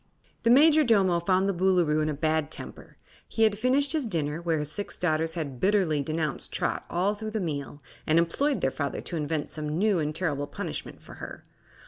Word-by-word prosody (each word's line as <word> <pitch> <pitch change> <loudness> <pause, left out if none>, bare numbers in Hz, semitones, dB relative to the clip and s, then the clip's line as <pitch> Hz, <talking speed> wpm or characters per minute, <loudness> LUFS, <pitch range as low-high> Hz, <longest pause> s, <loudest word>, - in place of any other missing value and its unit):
The 230 - +2
Majordomo 240 - +5
found 185 +2 +1
the 195 - +1
Boolooroo 175 -4 +2
in 155 - 0
a 150 - -2
bad 155 0 0
temper. - - -8 0.3
He 225 - 0
had 215 -2 +3
finished 270 +3 +2
his 300 -6 -1
dinner, 160 -4 -2
where 165 -2 0
his 150 0 -2
six 205 +5 -3
daughters 160 -1 +1
had 140 -7 -4
bitterly 185 -6 +2
denounced 155 -1 -3
Trot - - -2
all 185 +4 +1
through 215 +1 -6
the 215 0 -2
meal 145 -5 -5 0.2
and 155 - +3
implored 265 - +1
their 135 - +1
father 140 0 -3
to 175 - -5
invent 155 -1 -2
some 150 0 -3
new 200 -1 +2
and 150 -1 -2
terrible 145 -5 -1
punishment - - -6
for - - -12
her. - - -8
170 Hz, 195 wpm, -27 LUFS, 155-205 Hz, 0.3 s, Majordomo